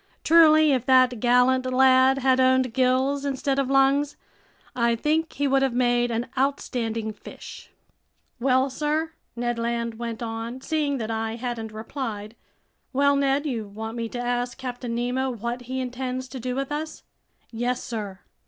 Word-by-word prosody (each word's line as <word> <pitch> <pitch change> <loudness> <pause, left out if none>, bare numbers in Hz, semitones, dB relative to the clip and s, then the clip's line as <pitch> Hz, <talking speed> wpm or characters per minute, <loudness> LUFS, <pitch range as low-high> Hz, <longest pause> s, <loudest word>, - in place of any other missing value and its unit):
Truly, 310 -2 +6
if 255 -4 +1
that 255 -2 +4
gallant 250 +2 +3
lad 260 +1 +5
had 260 -1 +2
owned 260 -2 +3
gills 265 +2 +1
instead 275 0 -1
of 270 -1 0
lungs, 275 +2 +2 0.6
I 235 -1 +2
think 310 +6 0
he 285 - 0
would 270 0 +3
have 265 -3 0
made 245 -1 +2
an 230 +1 -1
outstanding 230 -5 -1
fish! - - -11 0.7
"Well, 260 +1 +2
sir?" 305 +3 -1 0.2
Ned 240 0 -2
Land 235 -1 -2
went 235 -1 -4
on, 230 +2 -5
seeing 295 -1 -1
that 225 -2 -4
I 225 0 -2
hadn't 235 -2 -5
replied. 220 -1 -6 0.6
"Well, 280 +1 +3
Ned, 280 +1 +1
you 235 -7 -3
want 220 +3 -7
me 230 -1 -3
to 245 - -6
ask 245 0 -2
Captain 245 -2 -5
Nemo 250 +2 -1
what 240 +1 -4
he 260 0 -2
intends 255 0 -4
to 260 - -7
do 250 +1 -3
with 275 +1 -3
us?" 310 +1 -5 0.5
"Yes, 245 +2 -2
sir." 205 -5 -6
255 Hz, 160 wpm, -25 LUFS, 235-270 Hz, 0.7 s, Truly